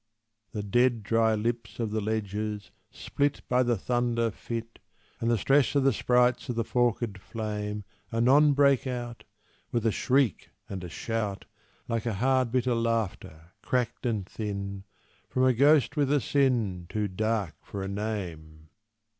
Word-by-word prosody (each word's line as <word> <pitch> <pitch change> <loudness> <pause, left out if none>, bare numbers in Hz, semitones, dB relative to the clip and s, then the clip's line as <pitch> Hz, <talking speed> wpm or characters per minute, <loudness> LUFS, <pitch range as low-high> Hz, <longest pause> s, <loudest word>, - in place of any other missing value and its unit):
The 105 - -4
dead, 120 +2 +2
dry 110 +1 +2
lips 115 -1 -3
Of 115 -3 -1
the 110 0 -1
ledges, 105 -1 -3 0.2
split 145 0 -2
By 125 0 +3
the 120 -2 +2
thunder 120 +1 0
fit 115 +1 -6 0.4
And 115 - 0
the 120 - +3
stress 135 +3 +3
of 140 - +4
the 135 -1 +4
sprites 125 +3 +2
of 120 - -1
the 115 - 0
forked 120 -3 0
flame, 105 0 -4 0.3
Anon 135 +6 +5
break 140 -2 +3
out, 120 -2 -5 0.5
With 120 -2 -1
a 115 - +4
shriek 130 - +1 0.2
and 95 -2 -6
a 90 - -6
shout, 105 +3 -3 0.4
Like 115 0 -2
a 110 - -1
hard, 130 +2 +2
bitter 125 0 +1
laughter, 110 -8 -2
cracked 125 0 -1
and 110 -5 -1
thin, 100 -2 -5 0.4
From 130 - +1
a 130 0 +5
ghost 145 +5 +4
with 145 -2 +1
a 145 - +4
sin 120 -11 +1
Too 105 -1 -1
dark 105 -2 -1
for 100 -1 -6
a - - -3
name! 85 -7 -5
115 Hz, 155 wpm, -28 LUFS, 105-125 Hz, 0.5 s, Anon